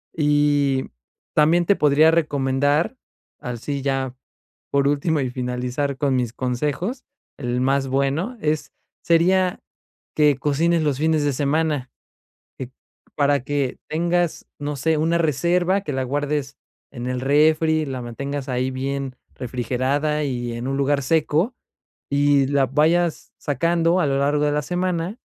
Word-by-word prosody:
Y 145 -3 +2 0.5
también 165 +3 +4
te 200 - +4
podría 150 +1 +4
recomendar 145 - +1 0.5
así 125 +4 -4
ya 135 -2 -2 0.6
por 140 0 +2
último, 145 +2 +1
y 130 - -2
finalizar 125 +2 -2
con 135 -1 +1
mis 120 -2 -1
consejos. 145 - -2 0.3
El 125 -2 -2
más 135 +1 +1
bueno 140 - -1
es 155 0 -1 0.3
sería 180 +3 +3 0.6
que 150 -3 +4
cocines 160 +4 +1
los 145 -3 0
fines 155 -1 +1
de 145 - +1
semana 145 -1 0 0.7
eh 130 - -5 0.5
para 145 -1 +2
que 140 -2 -2
tengas, 170 +1 0
no 145 0 -3
sé, 160 +4 +1
una 165 +2 +2
reserva 175 +4 +1
que 170 - -5
la 130 0 -1
guardes 145 +1 -2 0.4
en 125 -2 -6
el 125 0 -2
refri, 155 +3 +3
la 130 -2 -5
mantengas 140 +4 -5
ahí 130 +1 -1
bien 135 0 -3 0.2
refrigerada 130 +5 -1
y 120 -3 -3
en 120 +2 -5
un 135 - -1
lugar 140 +1 +1
seco 160 - +1 0.6
y 140 -1 +3
la 140 -1 +2
vayas 160 +5 +1
sacando 170 +5 +1
a - - +2
lo 135 - +1
largo 145 +1 +1
de 145 - +1
la 150 - +1
semana. 180 - -2
145 Hz, 140 wpm, -22 LUFS, 135-160 Hz, 0.7 s, también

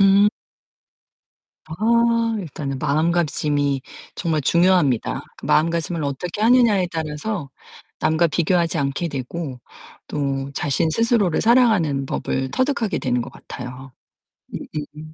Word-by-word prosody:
음. 200 +1 +6 1.4
아 230 +5 +2
일단은 140 -6 -5
마음가짐이 150 -2 +1 0.4
정말 160 -4 -1
중요합니다. 170 -6 +2 0.2
마음가짐을 165 0 +1
어떻게 170 +9 -3
하느냐에 230 -6 +4
따라서 160 +1 -3 0.5
남과 160 +2 +3
비교하지 170 +1 +1
않게 140 +5 -1
되고 135 -1 -5 0.5
또 140 -2 -2
자신 145 +3 0
스스로를 225 -4 +2
사랑하는 215 - +3
법을 130 0 -2
터득하게 255 - 0
되는 125 -4 0
것 - - -9
같아요. 125 +1 -9 0.8
음음음. 155 +1 -7
160 Hz, 270 characters per minute, -22 LUFS, 140-195 Hz, 1.4 s, 음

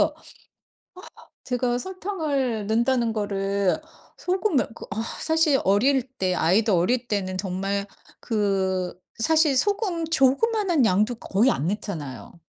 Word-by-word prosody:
어어 - - +2 1.3
제가 245 -1 -1
설탕을 295 - -2
넣는다는 235 +1 +1
거를 200 -2 -1 0.4
소금을 365 - 0
그 - - -10
어 215 +2 -4 0.2
사실 320 -4 +3
어릴 250 +7 +3 0.2
때 185 -1 0
아이들 195 +6 +2
어릴 235 +8 +1
때는 185 -3 -2
정말 195 +1 -2 0.3
그 190 -5 -1 0.2
사실 305 +3 +4
소금 395 - 0
조그만한 330 - +2
양도 210 +6 +2
거의 225 +5 +1
안 150 - -1
넣잖아요. 175 -7 -6
225 Hz, 240 characters per minute, -24 LUFS, 195-285 Hz, 1.3 s, 사실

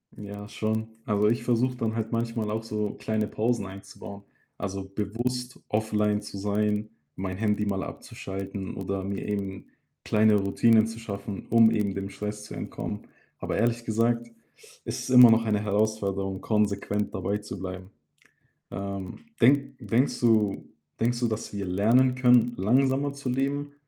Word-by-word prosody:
Ja 100 0 -8
schon. 110 +1 -2 0.2
Also, 105 -1 +2
ich 115 +1 +1
versuche 125 +1 +1
dann 115 -2 -2
halt 110 -1 -2
manchmal 115 -2 -1
auch 110 +1 -2
so 105 -2 -2
kleine 110 -1 -1
Pausen 115 -1 0
einzubauen. 100 +1 -10 0.3
Also, 95 -1 -4
bewusst 120 +6 -3
offline 105 -1 +1
zu 105 -1 -8
sein, 105 +1 0 0.3
mein 95 0 -4
Handy 105 0 +1
mal 95 -1 -1
abzuschalten 95 0 -6
oder 95 0 -3
mir 100 0 -4
eben 100 -2 -3 0.4
kleine 105 0 +4
Routinen 110 +3 +4
zu 115 0 -7
schaffen, 100 -2 -6
um 115 -1 +7
eben 105 -3 0
dem 95 0 -4
Stress 105 +1 -5
zu - - -9
entkommen. - - -5 0.4
Aber - - -2
ehrlich 120 0 +1
gesagt, 115 +1 +1 0.6
ist - - -3
es - - -6
immer 125 -1 +10
noch 115 0 +5
eine 105 -2 +2
Herausforderung, 100 -2 0
konsequent 105 -1 0
dabeizubleiben. 95 -2 -4 0.8
Ähm, 100 -1 -5 0.2
denk 140 +2 +4
denkst 120 +3 +1
du 110 -4 +2 0.3
denkst 120 +1 +1
du, 120 - +2
dass 110 0 -3
wir 100 -1 -3
lernen 115 +8 +3
können, 125 -2 +5
langsamer 135 +7 +2
zu 140 -2 -7
leben 140 +3 -1
105 Hz, 150 wpm, -27 LUFS, 100-115 Hz, 0.8 s, immer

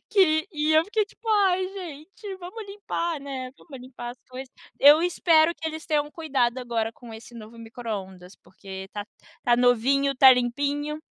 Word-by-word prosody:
Que 350 -3 +3
e 305 -2 0
eu 315 +1 +5
fiquei 425 +1 0
tipo: 430 +3 -13
"Ai 380 -3 +3
gente, 380 +2 -9
vamos 380 +5 -8
limpar, 345 -6 -4
né, 265 -2 -6
vamos 275 -6 -12
limpar 245 -2 -8
as 245 - -13
coisas". 255 +1 -9 0.3
Eu 295 +4 +7
espero 335 -2 +3
que 320 - -6
eles 315 +1 -7
tenham 295 -2 0
cuidado 270 -7 -1
agora 230 -3 -2
com 235 -2 -13
esse 230 +2 -12
novo 225 0 -11
microondas, 205 -5 -7
porque 195 +1 -20 0.2
está 205 +1 -7 0.3
está 240 -1 +2
novinho, 255 +3 +3
está 265 0 +8
limpinho. 285 +5 -1
280 Hz, 165 wpm, -25 LUFS, 240-335 Hz, 0.3 s, está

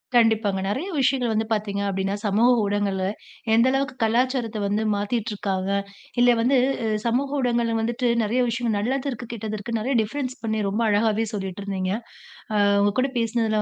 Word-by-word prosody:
கண்டிப்பாங்க. 220 -4 +3
நெறைய 270 - -2
விஷயங்கள் 260 -3 +2
வந்து 220 +1 0
பார்த்தீங்க 205 -2 -2
அப்டின்னா 195 +1 -1
சமூக 215 +5 +4
ஊடகங்கள்ல, 200 -2 0 0.5
எந்த 230 +3 +5
அளவுக்கு 275 0 -1
கலாச்சாரத்தை 235 -1 +1
வந்து 210 +2 0
மாத்திட்டு 215 +2 -2
இருக்காங்க. 195 -1 -2 0.5
இல்ல 245 - +6
வந்து, 255 +3 +3 0.3
அ - - 0 0.2
சமூக 275 +5 0
ஊடகங்கள்ல 235 -2 +1
வந்துட்டு 240 +2 0
நிறைய 235 +4 +1
விஷயம் 230 -2 -1
நல்லது 260 +6 -1
இருக்கு, 240 -1 -7
கெட்டது 215 -1 -4
இருக்கு 230 +2 -3
நெறைய 250 +4 -1
டிஃப்ரென்ஸ் 255 +3 -4
பண்ணி 220 -1 0
ரொம்ப 215 +4 -1
அழகாவே 215 +1 +2
சொல்லிட்டு 195 0 -5
இருந்தீங்க. 190 -2 -2 0.6
ஆ - - +3 0.3
உங்க 205 0 +2
கூட 270 - +1
பேசுனதுல 225 -2 +1
225 Hz, 165 wpm, -24 LUFS, 205-245 Hz, 0.6 s, இல்ல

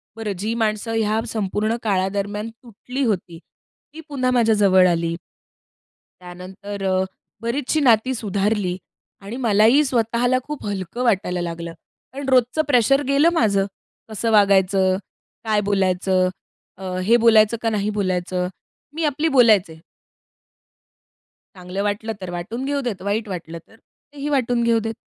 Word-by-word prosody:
बरं, 220 -2 -4
जी 220 +3 -2
माणसं 220 0 -1
ह्या 220 0 +1
संपूर्ण 215 +1 -1
काळादरम्यान 205 +1 -1
तुटली 245 +3 -7
होती, 180 -6 -2 0.5
ती 320 - -9
पुन्हा 255 -3 0
माझ्या 230 -3 +3
जवळ 190 -3 +5
आली. 170 -1 -1 1.1
त्यानंतर 190 +3 -8
अ, 185 0 +2 0.4
बरीचशी 260 +6 -1
नाती 255 -2 +3
सुधारली, 200 -3 -1 0.4
आणि 200 +4 -7
मलाही 220 +7 +5
स्वतःला 245 0 +1
खूप 300 +1 -7
हलकं 200 +4 -4
वाटायला 190 -6 0
लागलं. 170 -1 -5 0.4
पण 275 0 -6
रोजचं 255 +3 +3
प्रेशर 275 +1 +3
गेलं 280 +4 +4
माझं, 200 - +2 0.4
कसं 225 +1 -2
वागायचं? 190 -2 +3 0.5
काय 215 -2 +1
बोलायचं? 185 -1 +1 0.5
अ, 185 -1 -5
हे 235 +2 +6
बोलायचं 225 -1 +4
का 230 - +1
नाही 210 -1 -1
बोलायचं? 180 -2 -1 0.5
मी 325 - -2
आपली 295 +2 0
बोलायचे. 200 -9 +4 1.8
चांगलं 180 +2 -5
वाटलं 210 +2 -2
तर 185 - -6
वाटून 215 +9 -5
घेऊ 280 0 -1
देत, 235 -8 -4
वाईट 210 +3 -2
वाटलं 170 -3 -6
तर, 225 - -20 0.4
तेही 290 0 -4
वाटून 245 -4 +1
घेऊ 230 -1 +3
देत. 225 0 -4
215 Hz, 135 wpm, -21 LUFS, 190-235 Hz, 1.8 s, हे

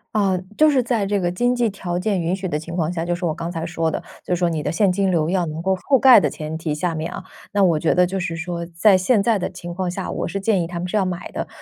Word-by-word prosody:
啊， 195 -3 +2 0.2
就 310 0 +6
是 270 -4 +2
在 230 -4 0
这 200 0 0
个 175 -1 0
经 245 +7 +1
济 240 -2 +1
条 180 -3 -4
件 190 0 0
允 170 +2 0
许 190 0 -7
的 150 - -1
情 165 +2 -7
况 165 -2 0
下， 165 -2 -3
就 175 0 0
说 175 -1 -2
我 - - -1
刚 165 +2 -5
才 165 -2 -4
说 165 -1 -1
的， - - -4 0.2
就 180 - 0
说 175 0 +1
你 160 -2 -2
的 150 - -2
现 190 +4 +2
金 195 +1 +1
流 165 -3 +1
要 180 -1 +1
能 155 0 -5
够 190 +2 +1
覆 265 +9 +2
盖 255 -2 +8
的 - - +1
前 155 +1 -5
提 160 -2 -3
下 170 +3 -1
面 160 0 -3
啊， 190 - -7 0.3
那 200 -1 +3
我 170 -4 +3
觉 160 - +1
得 180 0 +5
就 190 +2 -3
是 175 -2 -3
说， 170 +1 -4
在 175 +4 +4
现 200 +3 +2
在 225 -2 +2
的 - - -2
情 175 -1 -8
况 185 0 -2
下， 180 +1 -4
我 - - -3
是 195 - -4
建 195 -2 +2
议 165 - -2
他 175 0 -5
们 180 - -3
是 215 - 0
要 195 - +2
买 180 -1 -5
的。 - - -4
180 Hz, 335 characters per minute, -21 LUFS, 165-195 Hz, 0.3 s, 盖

